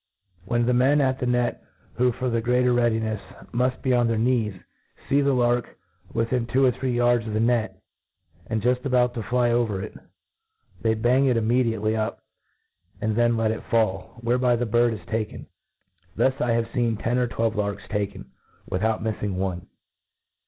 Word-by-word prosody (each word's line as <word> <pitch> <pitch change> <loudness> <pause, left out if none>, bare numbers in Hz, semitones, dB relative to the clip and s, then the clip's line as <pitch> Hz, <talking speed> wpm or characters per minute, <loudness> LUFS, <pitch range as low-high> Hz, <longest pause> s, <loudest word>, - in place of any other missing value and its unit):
When 120 +3 +1
the 125 - +2
men 130 +4 +4
at 135 -1 +1
the 125 - -1
net, 125 0 0 0.3
who, 125 +1 +2
for 125 +2 -3
the 115 0 0
greater 125 +1 +2
readinefs, 110 -3 +1 0.3
muft 125 +2 0
be 130 - +2
on 120 -1 +3
their 115 -1 0
knees, 115 -3 +1 0.5
fee 140 +1 +3
the 140 0 +2
lark 120 -1 0 0.3
within 115 +1 -1
tvfo 130 +2 +3
or - - +2
three 130 -2 -1
yards 120 -1 +2
of 110 - -4
the - - +1
ne^ 115 -3 +2 0.8
and 110 -2 -2
juft 125 +1 +1
about 125 -2 +2
to 115 - -4
fly 120 +1 +1
over 115 -5 +1
it, 105 - -7 0.9
they 110 -1 +2
bang 125 +5 +3
it 125 -3 +2
imme; 115 +3 +2
diately 110 -1 0
up^ 110 -1 -2 0.8
and 110 0 -1
then 120 0 +2
let 110 -1 +1
it 110 - -4
fall, 110 -3 0
whereby 125 +1 +2
the 120 +1 -1
bird 120 +1 +2
is 105 - -12
taken. 110 -1 -4 0.7
Thus 130 - +3
Ihave 115 -1 0
feen 120 -4 0
ten 120 +2 0
or 125 - +1
twelve 115 -1 -1
larks 105 -1 -2
taken, 105 -1 -4 0.4
without 110 +4 -1
miffing 105 -3 -2
one. 95 -1 -3
120 Hz, 180 wpm, -24 LUFS, 110-125 Hz, 0.9 s, men